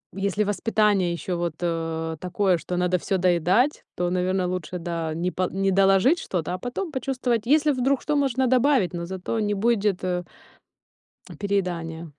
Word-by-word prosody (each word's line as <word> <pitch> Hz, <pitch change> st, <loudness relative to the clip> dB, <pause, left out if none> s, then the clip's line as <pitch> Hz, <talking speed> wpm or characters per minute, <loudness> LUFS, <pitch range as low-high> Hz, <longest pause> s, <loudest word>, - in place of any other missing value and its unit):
если 200 Hz, +2 st, 0 dB
воспитание 205 Hz, -3 st, +1 dB
ещё 175 Hz, +1 st, -3 dB
вот, 170 Hz, -2 st, -2 dB
э, 165 Hz, -1 st, -2 dB
такое, 185 Hz, 0 st, +1 dB
что 180 Hz, +2 st, -4 dB
надо 180 Hz, 0 st, +2 dB
всё 190 Hz, +2 st, -1 dB
доедать, 185 Hz, -, +2 dB
то, 175 Hz, 0 st, -1 dB
наверно, 185 Hz, 0 st, 0 dB
лучше, 180 Hz, -1 st, -4 dB
да, 165 Hz, -2 st, -3 dB
не 175 Hz, +3 st, -2 dB
по 185 Hz, -1 st, -1 dB
не 195 Hz, 0 st, 0 dB
доложить 195 Hz, -, +4 dB
что-то, 175 Hz, -1 st, -3 dB
а -, -, -2 dB
потом 305 Hz, -, -4 dB
почувствовать, 255 Hz, -4 st, -1 dB
если 300 Hz, +3 st, +4 dB
вдруг 265 Hz, 0 st, +1 dB
что, 300 Hz, -, -1 dB
можно 265 Hz, -2 st, +1 dB
добавить, 255 Hz, -6 st, +3 dB
но 170 Hz, -1 st, -4 dB
зато 190 Hz, +5 st, -3 dB
не 210 Hz, -1 st, 0 dB
будет, 205 Hz, -3 st, +1 dB
э 180 Hz, -1 st, -1 dB, 1.2 s
переедания. 170 Hz, -5 st, -2 dB
190 Hz, 165 wpm, -24 LUFS, 175-230 Hz, 1.2 s, доложить